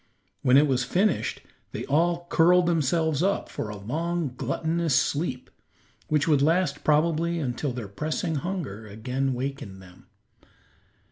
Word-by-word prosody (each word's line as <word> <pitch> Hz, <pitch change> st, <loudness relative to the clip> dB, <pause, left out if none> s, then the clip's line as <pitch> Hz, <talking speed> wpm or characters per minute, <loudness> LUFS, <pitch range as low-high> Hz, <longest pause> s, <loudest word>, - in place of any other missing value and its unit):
When 125 Hz, +1 st, +5 dB
it 145 Hz, -, +6 dB
was 130 Hz, -3 st, +1 dB
finished, 185 Hz, +9 st, 0 dB, 0.3 s
they -, -, -4 dB
all 170 Hz, +4 st, +1 dB
curled 175 Hz, +2 st, +5 dB
themselves 160 Hz, -2 st, +1 dB
up 195 Hz, +2 st, 0 dB
for 105 Hz, -, -5 dB
a 105 Hz, -, -6 dB
long, 160 Hz, -, -2 dB
gluttonous 160 Hz, +2 st, -1 dB
sleep, 140 Hz, -4 st, -1 dB, 0.6 s
which 150 Hz, -1 st, +1 dB
would 150 Hz, -4 st, +3 dB
last 160 Hz, -1 st, +1 dB
probably 165 Hz, +2 st, +2 dB
until 135 Hz, -1 st, -2 dB
their 120 Hz, -4 st, -6 dB
pressing 155 Hz, +8 st, -2 dB
hunger 140 Hz, -, -4 dB
again 125 Hz, +6 st, -2 dB
awakened 130 Hz, -6 st, -4 dB
them. 90 Hz, -1 st, -16 dB
150 Hz, 135 wpm, -26 LUFS, 125-170 Hz, 0.6 s, it